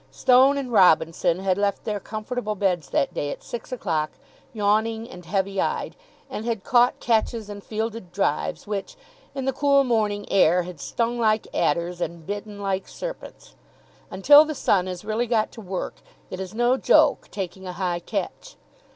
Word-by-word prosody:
Stone 260 +2 +4
and 265 -3 -4
Robinson 165 -3 +3
had 190 0 +1
left 200 -1 0
their 210 -3 -2
comfortable 215 +2 -4
beds 180 -7 0
that 140 - 0
day 145 - -2
at - - -7
six 240 +2 -7
o'clock, 160 -11 -1 0.4
yawning 220 +1 0
and 180 -6 -12
heavy 195 +1 0
eyed, - - -2 0.3
and 215 - -6
had 225 -4 -2
caught 245 0 +3
catches 225 -1 0
and 205 -1 -8
fielded 220 -3 -4
drives 200 - -1
which, 205 -2 -4 0.4
in 270 -1 -3
the 270 - 0
cool 280 0 +3
morning 215 -5 0
air, 180 -2 +4
had 175 -3 -9
stung 235 +9 -2
like 215 -1 +2
adders 170 +3 0
and 170 -2 -4
bitten 205 +1 -6
like 195 -1 -2
serpents. - - -8 0.6
Until 290 +10 +7
the 310 -1 -4
sun 190 -8 +2
has 180 +1 -6
really 220 +3 -1
got 220 -2 +1
to 225 - -11
work, 190 -2 -5 0.3
it 185 - -5
is 190 +2 -6
no 240 +2 +3
joke - - +3
taking 190 -1 -6
a 180 - -5
high 175 -1 -2
catch. - - -5
205 Hz, 170 wpm, -24 LUFS, 185-235 Hz, 0.6 s, Until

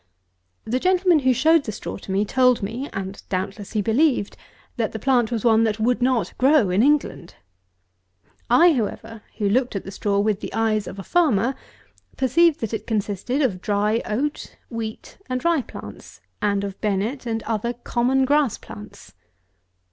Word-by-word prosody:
The 245 +3 -1
gentleman 365 0 +3
who 260 -2 +2
showed 315 +4 +3
the 215 - -3
straw - - -6
to 195 - -9
me, 195 +2 +1
told 250 0 +3
me 235 +8 -4
(and, 195 0 -6
doubtless, 195 +2 -4
he 210 -2 0
believed) 240 -1 +1 0.4
that - - -2
the - - -3
plant 250 -4 +1
was 230 -2 -2
one 225 -1 +5
that 220 -1 0
would 240 +2 +1
not 250 -2 +1
grow 265 -7 +4
in 190 +4 +3
England. 280 - 0 1.1
I 330 +8 +6
however, 225 -2 -4 0.2
who 205 - 0
looked 240 +3 +1
at 195 - -3
the 195 - -8
straw 200 +1 -1
with 205 0 +1
the - - -6
eyes 215 -2 0
of - - -8
a 195 - -6
farmer, 265 - +2 0.6
perceived 290 +5 +3
that 225 -1 -3
it 220 - -4
consisted 220 +5 -1
of 190 -9 -1
dry 210 +3 +1
oat, 280 +8 -3
wheat, 225 +5 -6
and 255 +4 -3
rye 335 -4 +3
plants, - - -11 0.2
and 200 -2 +1
of 195 -1 -6
Bennet 215 +6 -2
and 225 -1 -2
other 230 +1 -2
common 245 +2 0
grass 285 -3 +2
plants. 105 -2 -12
225 Hz, 170 wpm, -22 LUFS, 205-260 Hz, 1.1 s, I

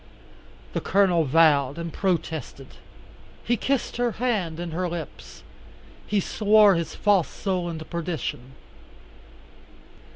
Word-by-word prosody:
The - - -2
Colonel 185 -4 +2
vowed 145 -2 +3
and 170 -1 -5
protested. 160 - -3 0.7
He 240 - +1
kissed 260 +2 -2
her 240 -2 0
hand 205 -10 -2
and 175 -2 -5
her 180 +1 -2
lips. 170 -1 -8 0.6
He 210 - +1
swore 210 +1 +4
his 170 -2 -3
false 200 -5 +2
soul 185 -4 -3
into 160 -1 -6
perdition. 160 -7 -5
175 Hz, 110 wpm, -24 LUFS, 160-205 Hz, 0.7 s, swore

